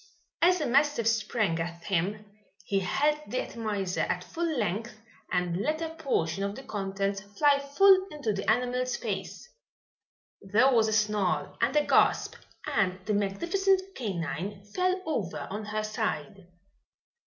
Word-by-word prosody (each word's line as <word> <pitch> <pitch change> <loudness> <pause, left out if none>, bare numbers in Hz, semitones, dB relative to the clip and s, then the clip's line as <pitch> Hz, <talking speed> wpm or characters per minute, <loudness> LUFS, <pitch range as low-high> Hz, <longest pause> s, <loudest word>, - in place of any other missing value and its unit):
As 360 +2 +5
the 310 - -2
mastiff 280 -2 +2
sprang 215 -6 +1
at 170 +1 -5
him, 200 +3 -1 0.4
he 195 - +1
held 295 +10 +1
the 255 - -3
atomizer 205 -5 -2
at 180 - -1
full 325 - -2
length 215 +2 -2 0.3
and 175 -1 0
let 305 +11 -1
a 325 -1 -3
portion 195 - -1
of 200 +1 -2
the 270 - -9
contents 195 -2 -2 0.2
fly 290 -1 +5
full 375 +7 +5
into 285 - -2
the 195 0 -2
animal's 250 +2 +1
face. - - -5 0.9
There 225 +8 +3
was 225 -2 +4
a - - 0
snarl 210 -3 +1
and 245 +5 +2
a 300 0 +4
gasp - - +3 0.3
and 185 -4 +1
the 210 - 0
magnificent 375 - +1
canine 195 - -4
fell 370 +1 +1
over 220 - -3
on 210 +2 -4
her 215 +1 -2
side. 215 -3 -3
215 Hz, 145 wpm, -28 LUFS, 195-290 Hz, 0.9 s, As